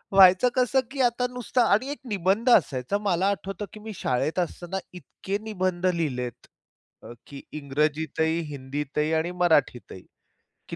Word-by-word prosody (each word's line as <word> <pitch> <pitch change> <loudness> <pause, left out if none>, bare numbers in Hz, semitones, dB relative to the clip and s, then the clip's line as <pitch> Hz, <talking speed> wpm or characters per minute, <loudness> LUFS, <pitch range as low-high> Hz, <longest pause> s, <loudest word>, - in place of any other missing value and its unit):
व्हायचं 190 +5 +7
कसं 255 +1 +3
की 275 -1 -2
आता 245 0 +2
नुसता 250 0 0
आणि 255 +6 +2
एक 290 - -6
निबंध 200 +5 +1
असायचा. 140 - +3
मला 195 -3 0
आठवतं 195 0 -4
की 215 - -10
मी 215 0 -8
शाळेत 140 +7 -1
असताना 175 +2 -3 0.2
इतके 190 +2 -5
निबंध 185 -4 -2
लिहिलेत, 135 -9 -2 0.6
अ, - - -9
की 140 -1 -9 0.2
इंग्रजीतही, 155 +3 0
हिंदीतही 145 +3 -3
आणि 160 +2 0
मराठीतही 135 - +1 0.7
की - - -5
180 Hz, 140 wpm, -26 LUFS, 150-210 Hz, 0.7 s, व्हायचं